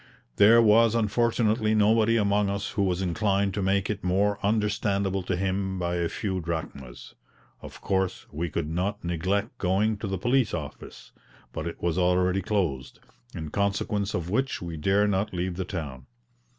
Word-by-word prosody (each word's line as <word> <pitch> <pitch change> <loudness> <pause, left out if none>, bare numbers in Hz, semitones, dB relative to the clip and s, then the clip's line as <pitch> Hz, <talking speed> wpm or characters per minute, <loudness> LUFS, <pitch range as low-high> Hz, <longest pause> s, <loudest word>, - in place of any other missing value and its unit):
There 115 +3 +7
was 115 +1 +5
unfortunately 110 0 +1
nobody 110 +2 +3
among 100 -1 +2
us 100 0 -3
who 100 - -1
was 95 -1 0
inclined 100 +2 0
to 105 - -2
make 95 0 +1
it 105 -1 -4
more 100 +3 +1
understandable 100 -2 0
to 90 0 -2
him 95 0 -1
by 90 -1 -1
a 85 -1 0
few 95 -3 -3
drachmas. 80 -7 -6 0.5
Of - - -11
course 95 -1 -1
we 80 +3 -3
could 75 0 -3
not 95 +6 -2
neglect 95 +6 -2
going 100 +4 +1
to 105 - -5
the 95 0 -2
police 120 +2 +1
office; 75 -3 -9 0.4
but 80 - -4
it 85 - -8
was 85 +1 0
already 90 +1 +2
closed, 80 -11 -2 0.4
in 80 -2 -6
consequence 100 +1 -1
of 85 -1 -3
which 130 +5 0
we 85 -4 -6
dare 100 +6 +2
not 100 0 -1
leave 90 +1 -2
the 95 0 -3
town. 70 -9 -6
95 Hz, 165 wpm, -26 LUFS, 90-105 Hz, 0.5 s, There